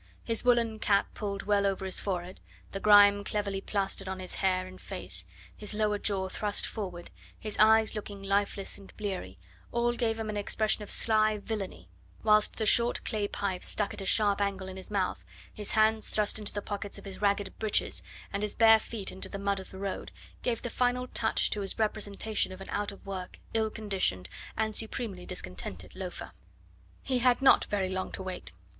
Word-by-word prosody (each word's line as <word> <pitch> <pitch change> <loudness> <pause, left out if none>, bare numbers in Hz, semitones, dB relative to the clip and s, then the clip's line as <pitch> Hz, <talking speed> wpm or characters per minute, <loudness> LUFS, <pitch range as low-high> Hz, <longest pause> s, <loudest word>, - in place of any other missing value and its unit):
His 230 -1 +1
woollen 235 -3 +3
cap 200 -2 +2
pulled 200 -2 -4
well 205 -1 +3
over 190 -1 -1
his 190 - -2
forehead, 185 -2 -3 0.3
the 195 - -4
grime 205 0 +7
cleverly 200 -1 -2
plastered 195 -1 -2
on 190 - -3
his 185 -1 -6
hair 185 -1 +1
and 185 0 -11
face, - - -3 0.3
his 210 0 -3
lower 210 -1 +1
jaw 195 -3 0
thrust 205 +2 0
forward, 180 -5 -6 0.3
his 215 -1 -5
eyes 220 0 +6
looking 205 -2 -6
lifeless 200 0 -1
and 195 - -13
bleary, 190 - -4 0.3
all 240 0 +2
gave 230 -2 0
him 225 -1 -3
an 210 -1 -3
expression 215 +1 +1
of 210 - -7
sly 215 -1 +3
villainy, 205 -2 -5 0.4
whilst 215 -1 +4
the 220 - -1
short 235 +3 +5
clay 215 -3 0
pipe 190 -3 -2
struck 205 -2 0
at - - -5
a - - -5
sharp 205 -1 +3
angle 195 -1 -1
in 190 - -7
his 190 - -8
mouth, 195 -3 -1 0.3
his 210 -1 -3
hands 220 0 +3
thrust 210 0 +1
into 210 - -3
the 205 - -4
pockets 205 -1 -4
of - - -11
his 195 0 -8
ragged 200 -1 +1
breeches, 215 -1 +1 0.3
and 200 - -1
his 210 -1 -1
bare 225 -1 +7
feet 215 -3 -4
in 190 - -10
the 200 - -4
mud 200 0 0
of 190 - -9
the 190 - -10
road, 195 0 -4 0.3
gave 235 -2 -1
the 240 - -2
final 250 +1 +1
touch 220 -1 +1
to 210 - -1
his 195 - 0
representation 215 -1 -1
of 185 - -8
an 195 - -8
out 205 0 -1
of 200 - -14
work, 185 -2 -6 0.2
ill 220 -1 +2
conditioned, 195 - -1 0.3
and 220 -1 0
supremely 215 -5 -4
discontented 90 - -6
loafer. 185 -1 -6 0.7
He 260 -2 0
had 245 0 +4
not 270 - +6
very 195 -2 -1
long 185 0 -3
to 190 - -4
wait. 185 -1 -5
205 Hz, 195 wpm, -30 LUFS, 195-220 Hz, 0.7 s, grime